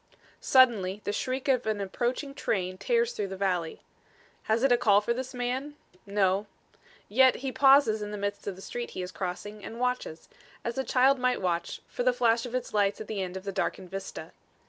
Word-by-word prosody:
Suddenly 215 -7 +4
the 205 - -2
shriek 260 +4 -2
of 255 -4 +2
an 215 -1 0
approaching 245 +8 -2
train 185 -9 -2
tears 475 -1 +1
through 200 - -2
the 190 0 -7
valley. 180 -4 -1 0.6
Has 225 +3 +1
it 270 - +4
a - - +7
call 205 -4 +5
for 225 +3 -1
this 260 +1 -5
man? 255 +4 -3 0.3
No. 200 0 +1 0.6
Yet 260 +4 +5
he 265 - -1
pauses 270 -6 +5
in 210 - -4
the 210 - -5
midst 200 0 -4
of 200 - -3
the 190 - -12
street 240 0 -5
he 185 - -2
is 180 - -6
crossing 195 +4 -5
and 230 - -7
watches, 250 -10 -2 0.4
as 235 +3 -2
a - - +1
child 265 +1 +3
might 250 0 +1
watch, 170 -2 -2
for - - -5
the 250 0 +3
flash 235 -1 +2
of 245 - -6
its 250 -3 -3
lights 205 -1 +2
at 220 - -6
the 205 -2 -3
end 185 0 -4
of 190 - -8
the 200 - -3
darkened 190 -1 -3
vista. 195 0 -6
220 Hz, 210 wpm, -28 LUFS, 195-255 Hz, 0.6 s, a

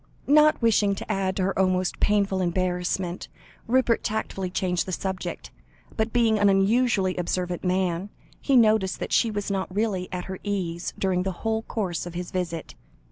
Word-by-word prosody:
Not 300 +1 +5
wishing 210 -3 +3
to - - -5
add 190 -1 -1
to 190 - 0
her 195 +1 -1
almost 185 -1 +1
painful 200 -2 +2
embarrassment, 180 0 -1 0.4
Rupert 245 -1 +2
tactfully 200 -3 -2
changed 180 -1 -1
the - - -3
subject, 190 +1 -4 0.4
but 220 0 0
being 225 -3 +3
an 205 0 +5
unusually 195 -1 +2
observant 180 0 -2
man, 185 0 0 0.3
he 275 - +2
noticed 215 -6 +4
that - - -4
she 230 - +3
was 205 -1 -3
not 190 -1 -2
really 195 -2 -1
at 180 -1 -4
her 190 -1 -6
ease 180 -4 -2
during 185 -2 +1
the 190 +1 -1
whole 220 0 +1
course 190 -7 -3
of 175 - -9
his 175 0 -5
visit. 170 -4 -3
190 Hz, 170 wpm, -25 LUFS, 180-215 Hz, 0.4 s, Not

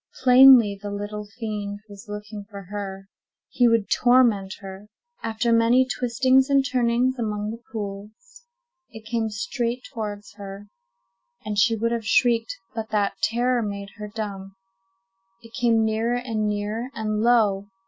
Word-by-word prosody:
Plainly, 250 -5 +7
the 205 - -5
little 205 +1 -5
fiend 205 -2 -5
was 205 +1 -13
looking 210 0 -7
for 200 -2 -9
her—he 200 +4 -3
would 230 -3 +2
torment 235 -6 +3
her. 195 +1 -10 0.3
After 225 +1 0
many 230 +3 +4
twistings 255 +2 +2
and 275 -1 +3
turnings 250 0 +1
among 210 -2 -2
the 230 +1 -9
pools, 205 -2 -5 0.8
it 220 -3 -12
came 225 -1 -1
straight 235 +4 -3
towards 210 -3 -6
her, 200 0 -9 0.8
and 210 -1 -1
she 225 +3 +4
would 230 +1 -1
have 230 -2 -3
shrieked, 245 - +2 0.2
but 220 -1 -5
that 205 -2 0
terror 240 +1 +1
made 200 -2 -5
her 210 -1 -6
dumb. 200 -3 -6 0.9
It 230 0 -15
came 230 -3 +2
nearer 220 +2 0
and 225 -4 -2
nearer, 210 +4 -3
and 215 -1 -2
lo! 215 -4 +3
220 Hz, 140 wpm, -24 LUFS, 205-240 Hz, 0.9 s, Plainly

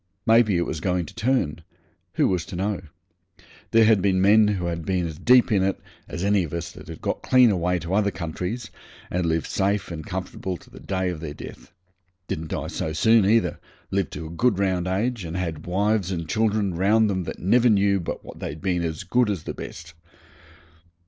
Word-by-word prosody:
Maybe 110 -4 +4
it 85 - +1
was 80 - -4
going 90 +1 0
to - - -12
turn 115 - 0 0.5
who - - +2
was 90 -3 0
to - - -7
know? 100 +1 -1 0.9
There 115 0 +5
had 110 -3 +4
been 95 -1 +2
men 105 +3 +6
who 95 -4 -1
had 85 -1 -3
been 90 +1 0
as 80 -2 -6
deep 125 -1 +5
in 100 -3 +3
it 95 +1 0 0.3
as 85 - -5
any 100 -1 +3
of 80 - -6
us 85 0 -4
that - - -13
had 80 0 -9
got - - -2
clean 125 -3 +5
away 90 -1 +1
to 85 +2 -4
other 100 0 +3
countries 95 +6 -5 0.4
and 90 -1 0
lived 80 -1 0
safe 100 0 -1
and 80 -2 -5
comfortable 90 +1 -4
to - - -20
the - - -12
day 95 -1 -2
of 90 -3 -4
their 75 -2 -6
death - - -11 0.6
didn't 80 +1 -4
die - - -3
so 80 - -3
soon 110 +4 +4
either 115 +2 +2 0.3
lived 95 -2 0
to 75 +2 -6
a 80 - -8
good 115 +4 +1
round 95 -2 0
age, 105 +4 -1
and 85 +1 -5
had 80 -4 -4
wives 100 +1 +1
and 85 -3 -3
children 110 -1 +1
round 105 +6 +3
them 95 -3 -1
that - - -5
never 120 +6 +3
knew 100 -2 +3
but 85 - -5
what - - -11
they'd 75 - -5
been 90 +1 0
as 80 0 -3
good 120 +5 +2
as 95 -6 -2
the - - -5
best. 80 +1 -9
95 Hz, 210 wpm, -24 LUFS, 85-105 Hz, 0.9 s, men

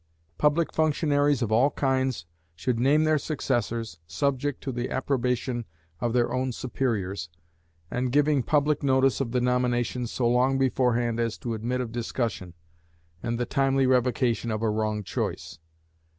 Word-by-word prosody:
Public 150 +2 +2
functionaries 145 -3 +2
of 110 - -2
all 120 +6 +4
kinds 130 - 0 0.3
should 115 +8 -1
name 145 +5 +4
their 155 -1 +3
successors, 120 - -2
subject 140 - -1
to 135 - -2
the 120 0 -3
approbation 125 -2 -1 0.4
of 120 - 0
their 120 0 +1
own 130 0 0
superiors, 100 -9 -2 0.6
and 125 0 -1
giving 145 0 +3
public 150 +2 +1
notice 135 -1 +2
of 120 -4 -2
the 125 - +1
nomination 125 0 0
so 120 +1 -1
long 125 +3 +3
beforehand 120 -3 +1
as 115 -2 -1
to 120 - -4
admit 120 +3 -2
of 120 -3 -4
discussion, 115 -6 -3 0.7
and 115 0 -2
the 120 - 0
timely 135 +1 +2
revocation 125 -2 +1
of 110 0 -2
a 110 - +2
wrong 110 -1 -1
choice. 90 - -4
125 Hz, 150 wpm, -26 LUFS, 115-135 Hz, 0.7 s, all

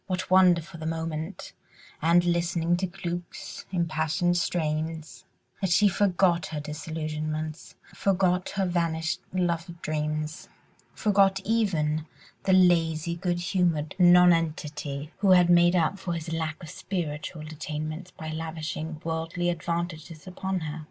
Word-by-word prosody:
What 185 -1 -3
wonder 180 -3 +6
for 170 +1 -11
the 160 0 -5
moment, 160 +2 -4 0.5
and 170 +3 +4
listening 170 0 +1
to 185 +1 -1
Glück's 175 0 -6
impassioned 170 0 0
strains, 160 -2 -2 0.4
that 190 - +1
she 205 +4 +5
forgot 185 -3 +2
her 155 - -4
disillusionments, 155 0 -4 0.2
forgot 185 -2 +1
her 195 -1 +1
vanished 170 -1 -1
love 170 -1 -1
dreams, 155 0 -3 0.5
forgot 195 -2 +3
even 160 -9 +1 0.4
the 190 - +4
lazy, 170 -3 +3
good 175 0 -1
humoured 175 -5 0
nonentity 165 -5 +3
who 195 -1 +2
had 175 -1 +5
made 175 +1 +5
up 175 +3 +1
for 180 -2 -3
his 165 0 -4
lack 160 0 -3
of 155 - -8
spiritual 170 -4 -4
attainments 155 +2 -5
by 160 -3 -7
lavishing 160 0 -4
worldly 165 +2 -1
advantages 170 -1 -4
upon 185 0 -3
her. 155 0 -5
170 Hz, 125 wpm, -27 LUFS, 155-180 Hz, 0.5 s, wonder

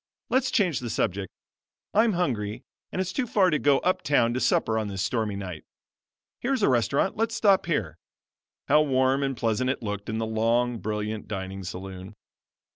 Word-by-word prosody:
Let's 260 - +2
change 180 - +2
the 120 - -5
subject. 95 -2 -1 0.6
I'm 220 +1 +4
hungry 115 - -2 0.3
and - - -3
it's 185 -1 -2
too 260 -3 -1
far 190 -4 +3
to 150 - +2
go 145 -1 +4
up 185 - +1
town 120 -5 +2
to 125 - -1
supper 110 -3 +2
on 110 - -2
this 95 -1 -3
stormy 110 -1 -1
night. 90 -5 -6 0.8
Here's 265 +1 0
a - - +5
restaurant: 130 - +1
let 225 +1 +1
us 225 - -5
stop 200 -6 +3
here." 95 - -1 0.7
How 150 - +5
warm 130 -1 +2
and 135 -2 -1
pleasant 115 +3 0
it 130 - -2
looked 105 -1 -4
in 110 - -2
the 115 - -1
long, 115 +2 +1
brilliant 105 0 -3
dining 95 -1 -5
saloon! 95 +2 -7
115 Hz, 185 wpm, -26 LUFS, 105-150 Hz, 0.8 s, a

